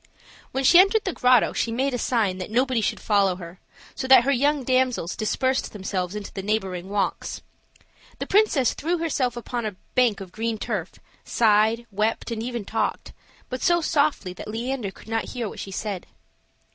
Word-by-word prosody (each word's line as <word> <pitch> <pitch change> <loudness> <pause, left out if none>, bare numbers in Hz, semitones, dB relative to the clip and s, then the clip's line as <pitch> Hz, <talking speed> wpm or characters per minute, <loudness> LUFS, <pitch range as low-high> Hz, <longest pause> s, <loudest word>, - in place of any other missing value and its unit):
When 270 - -1
she 345 +7 +7
entered 395 +3 +5
the 380 - -1
grotto, 250 -2 +4
she 230 - -1
made 265 +4 0
a 245 - -1
sign 210 -8 0
that 185 - -5
nobody 250 +1 +1
should - - -1
follow 200 -3 +2
her, 175 0 -10 0.3
so 260 - -4
that 260 -2 +8
her 275 - +2
young 285 +2 +2
damsels 255 -8 +1
dispersed 260 +4 -1
themselves 190 -2 -3
into 210 -1 -6
the 195 - -4
neighboring 190 -3 -2
walks. 205 0 -2 0.7
The - - -4
princess 380 - +3
threw 340 +4 -1
herself 270 -7 -1
upon 240 0 -4
a 210 -3 -4 0.2
bank 245 -5 +3
of 190 -2 -9
green 225 +2 -2
turf, 210 -6 -3 0.3
sighed, 220 +1 +3
wept, 215 +4 -1
and 225 -1 -3
even 235 -3 -4
talked, - - -2 0.3
but 255 0 -5
so 345 -2 +3
softly 285 - 0
that - - -9
Leander 235 0 -3
could 195 - -15
not 225 0 -1
hear 240 -3 -2
what - - -8
she - - -6
said. 195 -1 -4
230 Hz, 185 wpm, -24 LUFS, 205-260 Hz, 0.7 s, that